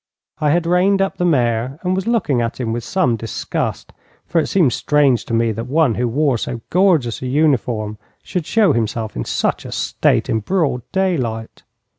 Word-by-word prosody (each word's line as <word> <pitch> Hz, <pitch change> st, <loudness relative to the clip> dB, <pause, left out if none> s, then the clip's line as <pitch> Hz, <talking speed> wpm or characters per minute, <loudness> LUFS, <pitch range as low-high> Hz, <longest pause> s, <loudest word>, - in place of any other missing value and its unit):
I 150 Hz, -, +1 dB
had 170 Hz, +3 st, +2 dB
reined 180 Hz, +3 st, +3 dB
up 195 Hz, 0 st, 0 dB
the 180 Hz, -, 0 dB
mare 125 Hz, -4 st, +1 dB
and 180 Hz, 0 st, 0 dB
was 190 Hz, +2 st, -3 dB
looking 185 Hz, -, +1 dB
at 115 Hz, +2 st, -3 dB
him 115 Hz, -3 st, -2 dB
with 120 Hz, 0 st, -3 dB
some 175 Hz, -6 st, +1 dB
disgust, 115 Hz, +1 st, -4 dB, 0.3 s
for 165 Hz, 0 st, +1 dB
it -, -, -3 dB
seemed 165 Hz, -11 st, +2 dB
strange 140 Hz, -4 st, +2 dB
to -, -, -5 dB
me 115 Hz, 0 st, +2 dB
that 115 Hz, +3 st, -5 dB
one 145 Hz, -2 st, +2 dB
who 120 Hz, +2 st, -1 dB
wore 135 Hz, 0 st, +1 dB
so 120 Hz, 0 st, -4 dB
gorgeous 170 Hz, -, +2 dB
a 130 Hz, -, -3 dB
uniform 125 Hz, -7 st, 0 dB, 0.2 s
should 180 Hz, -5 st, -4 dB
show 220 Hz, -3 st, +3 dB
himself 110 Hz, -1 st, -2 dB
in -, -, -3 dB
such -, -, -1 dB
a -, -, -8 dB
state -, -, +1 dB
in 110 Hz, -, 0 dB
broad 150 Hz, -, 0 dB
daylight. 130 Hz, -13 st, -2 dB
135 Hz, 190 wpm, -19 LUFS, 115-175 Hz, 0.3 s, reined